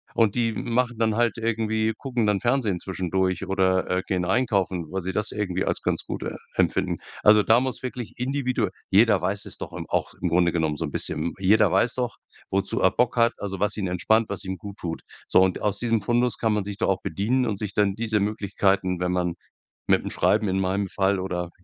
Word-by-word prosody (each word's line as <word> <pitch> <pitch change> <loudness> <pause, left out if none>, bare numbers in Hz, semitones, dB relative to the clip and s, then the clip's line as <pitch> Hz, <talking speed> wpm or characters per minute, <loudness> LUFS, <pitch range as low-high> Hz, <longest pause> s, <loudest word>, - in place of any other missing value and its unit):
Und 110 -3 +3
die 115 -2 +1
machen 120 +1 -1
dann 110 -2 +2
halt 115 -1 +1
irgendwie 110 -1 0
gucken 125 -5 -1
dann 105 -1 +2
Fernsehen 120 -5 +1
zwischendurch 95 0 -1
oder, 95 -1 +1
äh, 90 0 0
gehen 90 -2 0
einkaufen, 95 -5 0
weil 95 0 -2
sie 95 +2 -3
das 105 +2 +2
irgendwie 95 -3 -2
als - - -1
ganz - - -1
gut, - - -5
äh, - - -4 0.2
empfinden. - - 0 0.3
Also 105 0 +7
da 110 +3 +4
muss 130 0 -3
wirklich 125 -2 -6
individuell 130 -4 0 0.2
jeder 105 0 +5
weiß 95 +3 +1
es - - -7
doch - - -7
im - - -6
auch - - -1
im 90 - 0
Grunde 85 +1 +3
genommen 80 -3 -1
so 80 - -2
'n 75 - -6
bisschen. - - +1
M - - -10
jeder 100 +4 +4
weiß 120 - +2
doch, 125 -2 -3 0.3
wozu 95 0 -1
er 95 - +4
Bock 125 +3 0
hat, 115 0 +4
also 95 -2 -4
was 105 +1 +2
ihn 100 -3 -2
entspannt, 110 +5 +1
was - - -3
ihm 95 0 -4
gut 100 +3 -9
tut. 80 -2 -5 0.3
So - - +5
und 95 -1 +2
aus 105 -1 0
diesem 115 -2 +1
Fundus 120 +1 +1
kann 110 -2 +1
man 105 -1 0
sich 100 0 -6
doch 110 - 0
auch 95 -1 0
bedienen 125 +6 0
und 105 - -2
sich 105 -1 -3
dann 100 -1 +2
diese 110 -1 0
Möglichkeiten, 100 -3 0
wenn 90 0 0
man 90 -1 0 0.5
mit - - +3
'm - - -4
Schreiben 105 +1 +2
in 95 0 0
meinem 95 +1 0
Fall, 95 +1 0
oder, 90 -2 -3
100 Hz, 225 wpm, -25 LUFS, 95-115 Hz, 0.5 s, Also